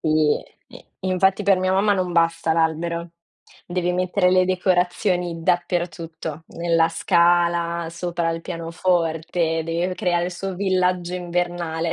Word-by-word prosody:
Sì, 155 -1 +2 0.3
sì, - - -14 0.2
infatti 190 +2 +1
per 195 -2 +4
mia 185 0 +1
mamma 200 +2 +3
non 185 -2 -1
basta 165 -1 +2
l'albero. 165 +1 -1 0.6
Devi 180 0 -1
mettere 180 +1 +1
le 185 0 +4
decorazioni 180 -1 0
dappertutto, 170 -2 -2
nella 165 -1 +1
scala, 170 0 +2
sopra 170 0 -2
il 165 0 -3
pianoforte, 165 -1 -1
deve 170 +3 -1
creare 175 -1 0
il 180 - -5
suo 190 +2 -5
villaggio 180 -2 0
invernale. 175 -2 -2
175 Hz, 125 wpm, -22 LUFS, 165-180 Hz, 0.6 s, per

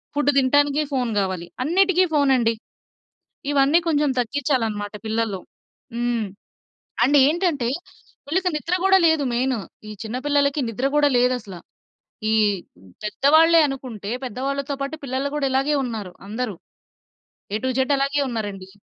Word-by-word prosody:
Food 290 0 +3
తింటానికి 285 +2 +3
phone 250 -3 0
గావాలి, 185 -3 -2 0.2
అన్నిటికీ 370 +3 +3
ఫోన్ 285 -2 +3
అండి. 230 -2 +2 1.0
ఇవన్నీ 285 +3 +4
కొంచెం 295 -2 +2
తగ్గిచ్చాలన్నమాట 225 -5 -1
పిల్లల్లో. 220 -3 -1 0.6
హ్మ్. 240 -2 -1 0.8
అండ్ 285 +1 +4
ఏంటంటే, 305 -6 +1 0.6
వీళ్ళకి 365 +4 +1
నిద్ర 340 +4 -1
కూడా 385 0 +6
లేదు 320 -3 +2
మెయిన్. 255 0 0 0.3
ఈ - - -6
చిన్న 225 +3 -4
పిల్లలకి 285 0 +2
నిద్ర 245 +5 -1
కూడా 290 -1 +4
లేదు 250 +1 +3
అసల. 195 -5 -10 0.8
ఈ - - +2 0.7
పెద్దవాళ్ళే 315 +9 +5
అనుకుంటే, 245 -7 -6
పెద్దవాళ్ళతో 275 +4 -3
పాటు 280 +3 -4
పిల్లలు 270 +2 -2
కూడా 280 -2 0
ఇలాగే 275 +3 +1
ఉన్నారు, 215 -7 -5 0.2
అందరూ. 220 -3 -3 1.0
ఎ - - +2
టు - - +1
జడ్ 265 +2 +2
అలాగే 275 +1 0
ఉన్నారండి. 205 -5 -5
270 Hz, 130 wpm, -22 LUFS, 230-290 Hz, 1.0 s, కూడా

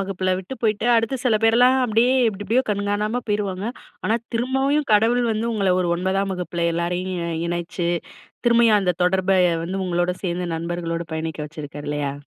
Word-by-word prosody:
வகுப்புல 185 -1 -1
விட்டு 190 +8 -7
போய்ட்டு, 215 0 +1
அடுத்து 230 +4 0
சில 225 -4 +3
பேர்லாம் 245 +3 +5
அப்டியே, 235 +3 +3 0.2
எப்டி 205 -1 -5
எப்டியோ 240 +6 +3
கண்காணாம 205 +3 -1
போயிருவாங்க. 200 -1 -1 0.4
ஆனா, 225 - +2 0.2
திரும்பயும் 265 +4 +1
கடவுள் 230 +4 +4
வந்து 220 +1 -2
உங்கள 195 -3 +2
ஒரு 175 - 0
9ஆம் 190 +2 -1
வகுப்புல 175 -1 -2
எல்லாரையும் 175 +2 -2 0.3
இ - - -2
இணைச்சு, 175 0 -2 0.6
திரும்பயும் 235 -3 +5
அந்த 180 -2 +1
தொடர்ப 190 +1 +2
எ - - 0
வந்து 190 +3 -3
உங்களோட 175 0 0
சேர்ந்து 180 0 -2
நண்பர்களோடு 170 0 -3
பயணிக்க 160 -1 -4
வச்சுருக்காரு, 145 -1 -8
இல்லையா? 145 -2 -2
195 Hz, 160 wpm, -22 LUFS, 175-225 Hz, 0.6 s, பேர்லாம்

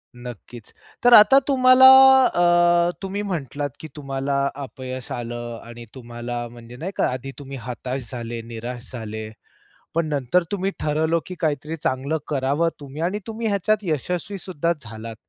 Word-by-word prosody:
नक्कीच. 120 -2 -11 0.3
तर 245 0 +6
आता 235 +5 +9
तुम्हाला 255 -1 +7 0.4
अ, 175 -2 +3
तुम्ही 195 +1 -3
म्हटलात 145 - -3
की 160 - -8
तुम्हाला 140 -1 -3 0.3
अपयश 130 -1 -8
आलं 120 -1 -5
आणि 120 0 -10
तुम्हाला 120 -1 -6
म्हणजे 120 0 -12
नाही 170 +8 -5
का - - +1
आधी 130 +2 -5
तुम्ही 135 -1 -8
हताश 125 +1 -6
झाले, 120 -2 -5
निराश 120 +2 -8
झाले. 110 -2 -6 0.7
पण 165 -1 +1
नंतर 145 +4 +1
तुम्ही 195 -1 -1
ठरवलं 160 +2 +1
की 185 - -7
काहीतरी 155 0 -2
चांगलं 135 +4 -1
करावं 145 +3 0
तुम्ही 145 +1 -8
आणि 185 +5 -1
तुम्ही 225 0 -3
ह्याच्यात 210 +1 +1
यशस्वीसुद्धा 175 +1 -2
झालात. 110 -1 -9
140 Hz, 140 wpm, -22 LUFS, 120-175 Hz, 0.7 s, आता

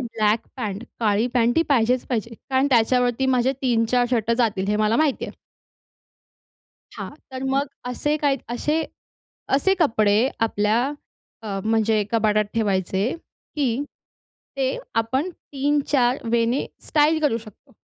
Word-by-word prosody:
Black 220 -3 0
pant 210 -3 -4 0.2
काळी 215 0 +2
pant 240 +2 +2
ही - - +5
पाहिजेच 250 -2 +2
पाहिजे, 230 -1 -3 0.2
कारण 265 +1 +3
त्याच्यावरती 245 +2 +3
माझे 250 +2 +2
3-4 245 0 +2
शर्ट 230 -2 0
जातील, 205 -5 +1
हे 210 - +2
मला 215 +1 +2
माहिती 305 -4 +1
आहे. - - -9 1.6
हां. - - -5 0.2
तर 260 0 -5
मग 275 +1 +1 0.2
असे 295 +4 -1
काही 280 -2 +1
असे 300 +6 0 0.7
असे 385 +7 +3
कपडे 220 -4 +3 0.2
आपल्या 210 +3 +1 0.6
अ, 200 -3 -4
म्हणजे 220 -1 +2
कपाटात 215 -2 +2
ठेवायचे, 200 0 0 0.4
की 275 -2 0 0.7
ते 265 -1 0 0.2
आपण 260 +10 0
3-4 280 -4 0
वेने 235 +3 +1 0.2
स्टाइल 310 +1 +3
करू 255 -6 +2
शकतो. 215 -3 -16
240 Hz, 130 wpm, -23 LUFS, 220-270 Hz, 1.6 s, ही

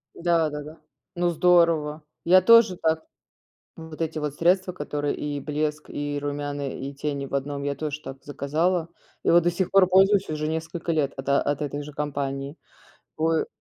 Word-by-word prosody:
Да-да-да. 160 -2 -1 0.4
Ну, 175 0 +1
здорово. 165 -3 +3 0.2
Я 185 +2 +6
тоже 225 -3 +6
так 160 0 +1 0.7
вот 160 -1 -10
эти 160 -1 -2
вот 150 -2 -3
средства, 180 +3 +2
которые 145 -3 -3
и 145 -1 -4
блеск, 150 +1 -3
и 145 0 -3
румяна, 145 -1 -3
и 135 +1 -6
тени 140 0 -3
в 140 - -8
одном, 140 +1 -2
я 140 0 -1
тож 150 -1 -4
так 135 -2 -9
заказала, 160 +5 -1 0.4
и - - +3
вот 170 0 +5
до 175 - +3
сих 175 +1 -2
пор 195 -1 +6
пользуюсь 195 +2 +4
уже 155 0 -2
несколько 160 +1 -4
лет 150 -3 0
от 135 0 -7
от 140 +1 +1
этой 145 0 -3
же 150 0 -9
компании. 140 0 -3 0.6
Вы 160 0 +1
155 Hz, 170 wpm, -25 LUFS, 145-170 Hz, 0.7 s, Я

